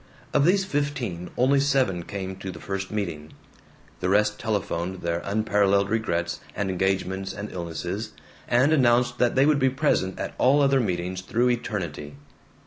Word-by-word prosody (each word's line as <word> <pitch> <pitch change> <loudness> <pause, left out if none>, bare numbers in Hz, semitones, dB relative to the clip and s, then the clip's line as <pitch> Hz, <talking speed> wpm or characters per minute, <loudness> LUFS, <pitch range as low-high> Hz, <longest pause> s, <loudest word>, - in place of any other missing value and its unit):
Of 145 -1 +4
these 190 +3 +3
fifteen 135 - -2
only 135 +3 +4
seven 135 -10 +1
came 95 +1 -5
to 95 0 -6
the - - -10
first 95 0 -4
meeting. 85 -8 -4 0.7
The 90 - -1
rest 105 +2 +2
telephoned 95 -4 -2
their 85 0 -1
unparalleled 100 -1 +2
regrets 85 -7 -1 0.2
and 100 -1 -1
engagements 95 +1 -1
and 105 +1 -6
illnesses, 90 +5 -4 0.3
and 130 +6 +3
announced 120 -3 +3
that 125 - +2
they 135 +1 +5
would 150 -1 +3
be 130 -1 +4
present 130 -9 0
at - - -4
all 140 +3 +5
other 135 -1 +4
meetings 90 -4 -2
through 120 +6 +1
eternity. 85 -11 -4
100 Hz, 155 wpm, -25 LUFS, 95-125 Hz, 0.7 s, they